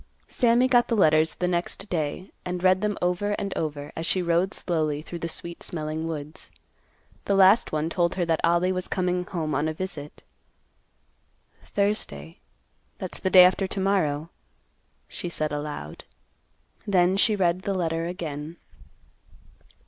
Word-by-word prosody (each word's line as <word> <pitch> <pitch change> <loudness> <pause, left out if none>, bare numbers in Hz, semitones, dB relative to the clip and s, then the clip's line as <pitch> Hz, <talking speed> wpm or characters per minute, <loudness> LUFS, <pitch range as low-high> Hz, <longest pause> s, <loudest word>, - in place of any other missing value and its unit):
Sammy 240 +1 +3
got 245 -2 +4
the 230 - 0
letters 155 -3 +4
the 180 - -1
next 180 +3 -2
day, 165 +2 -3
and 180 0 -4
read 185 0 +4
them 210 -1 -1
over 180 +4 0
and 200 -1 -3
over, 145 -2 -4
as 165 - -3
she 185 - +2
rode 170 +2 +1
slowly 155 -4 -1
through 170 +1 -7
the 170 - -3
sweet 170 +1 -7
smelling 155 0 -4
woods. 155 -1 -7 0.8
The 200 - +1
last 195 +4 +5
one 155 0 -1
told 170 0 0
her 180 -2 0
that 165 -1 0
Ollie 175 +2 +3
was 185 -1 -2
coming 180 -1 0
home 160 -5 -3
on 145 +3 0
a 155 - -3
visit. 160 -5 -7 1.4
"Thursday, 85 - -2 0.6
that's - - -6
the 190 - 0
day 185 -1 +9
after 190 +1 +2
to 195 - -4
morrow," 170 -5 0 0.8
she 175 - -5
said 155 -2 -2
aloud. 145 - -5 0.8
Then 185 -2 +3
she 210 +2 +3
read 180 -2 +1
the 195 +1 -2
letter 165 -2 -1
again. 160 -2 -6
175 Hz, 155 wpm, -25 LUFS, 155-190 Hz, 1.4 s, day